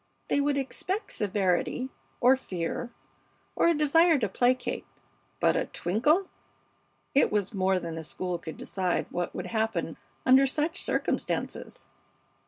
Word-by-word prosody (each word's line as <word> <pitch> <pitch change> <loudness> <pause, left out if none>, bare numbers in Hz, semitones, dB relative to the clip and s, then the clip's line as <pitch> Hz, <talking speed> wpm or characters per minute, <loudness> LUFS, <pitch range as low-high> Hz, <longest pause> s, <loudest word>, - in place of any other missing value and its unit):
They 285 - +2
would 285 0 +1
expect 365 - -3
severity, 205 +5 0 0.3
or 255 +2 +7
fear, 190 -1 -4 0.7
or - - +3
a 340 - +4
desire 320 +2 +5
to 225 -5 0
placate; 245 +6 0 0.5
but - - +3
a - - 0
twinkle 295 - +1 0.9
it 280 - +4
was 205 0 0
more 190 -1 +2
than 170 -2 -4
the 160 0 -5
school 180 +2 -3
could 160 -1 -8
decide 185 -2 -1
what 175 -1 -3
would 180 - -4
happen 220 -7 -1 0.3
under 265 +1 +6
such 310 +6 -1
circumstances. - - -2
225 Hz, 135 wpm, -28 LUFS, 185-280 Hz, 0.9 s, or